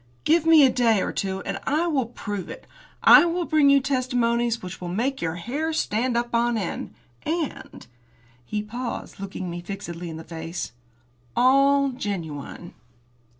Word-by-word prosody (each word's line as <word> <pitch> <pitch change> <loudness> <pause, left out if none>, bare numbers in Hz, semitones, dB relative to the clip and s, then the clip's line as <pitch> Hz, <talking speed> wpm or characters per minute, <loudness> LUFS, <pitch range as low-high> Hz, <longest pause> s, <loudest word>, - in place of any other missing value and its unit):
Give 325 +1 +3
me 320 -3 +8
a - - +5
day 230 -4 +3
or - - -2
two 190 -1 -3
and - - -4
I 305 +4 +2
will 280 -8 0
prove 205 -5 -6
it. - - -9 0.4
I - - +9
will 345 0 -1
bring 305 -3 +4
you 280 0 +6
testimonials 240 -4 0
which 180 0 -7
will 180 - -5
make 240 +10 -1
your 165 -1 -2
hair 275 - -3
stand 240 -3 0
up 240 0 -2
on 235 0 +2
end, 195 -5 -4 0.3
and 325 -2 -4 0.3
" 120 - -32 0.2
He 210 - -3
paused, 235 +1 -6
looking 190 -1 -5
me 175 0 -5
fixedly 175 -2 -6
in 160 - -7
the 160 - -8
face 165 +1 -6 0.6
"all 275 +2 +4
genuine." 175 - -6
235 Hz, 165 wpm, -24 LUFS, 185-275 Hz, 0.6 s, I